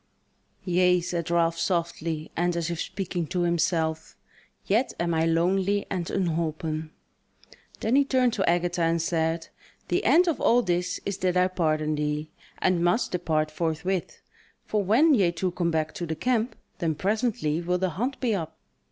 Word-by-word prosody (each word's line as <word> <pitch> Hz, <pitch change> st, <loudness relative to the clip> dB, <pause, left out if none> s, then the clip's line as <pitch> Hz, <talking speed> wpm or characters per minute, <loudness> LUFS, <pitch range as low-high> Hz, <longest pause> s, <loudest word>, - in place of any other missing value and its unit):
"Yea," 180 Hz, 0 st, +3 dB
said 170 Hz, -1 st, -3 dB
Ralph, 165 Hz, -1 st, +2 dB
softly, 165 Hz, -3 st, -2 dB
and 175 Hz, 0 st, 0 dB
as 170 Hz, 0 st, -1 dB
if 170 Hz, -, -3 dB
speaking 180 Hz, -4 st, -3 dB
to 180 Hz, -, -1 dB
himself, 165 Hz, -2 st, 0 dB, 0.5 s
"yet 225 Hz, +7 st, +1 dB
am 170 Hz, 0 st, 0 dB
I 160 Hz, 0 st, +2 dB
lonely 190 Hz, +4 st, +1 dB
and 175 Hz, -3 st, -2 dB
unholpen." 160 Hz, -3 st, -2 dB, 0.9 s
Then 225 Hz, +4 st, +1 dB
he 280 Hz, -, +6 dB
turned 255 Hz, -3 st, +2 dB
to 195 Hz, -5 st, +1 dB
Agatha 175 Hz, 0 st, +1 dB
and 165 Hz, 0 st, +2 dB
said: 165 Hz, 0 st, -1 dB, 0.4 s
"The -, -, +1 dB
end 360 Hz, +2 st, +5 dB
of 330 Hz, -, 0 dB
all 245 Hz, +1 st, +4 dB
this 180 Hz, -1 st, -1 dB
is 200 Hz, -1 st, -3 dB
that 180 Hz, -1 st, +1 dB
I 180 Hz, 0 st, +4 dB
pardon 155 Hz, -4 st, 0 dB
thee, 150 Hz, +1 st, -2 dB, 0.3 s
and 180 Hz, -2 st, +1 dB
must 175 Hz, +8 st, +2 dB
depart 155 Hz, -4 st, 0 dB
forthwith; 170 Hz, +3 st, -2 dB, 0.4 s
for 210 Hz, -1 st, 0 dB
when 260 Hz, -, +4 dB
ye 195 Hz, -9 st, +3 dB
two 175 Hz, +2 st, -2 dB
come 175 Hz, -1 st, -1 dB
back 160 Hz, -1 st, -1 dB
to 175 Hz, -, -5 dB
the 160 Hz, -, -2 dB
camp, 240 Hz, +6 st, 0 dB, 0.2 s
then 160 Hz, -2 st, 0 dB
presently 195 Hz, -, 0 dB
will 180 Hz, +1 st, 0 dB
the 185 Hz, 0 st, -1 dB
hunt 245 Hz, -, -3 dB
be 240 Hz, -4 st, +1 dB
up." 160 Hz, -5 st, -4 dB
175 Hz, 170 wpm, -26 LUFS, 160-190 Hz, 0.9 s, he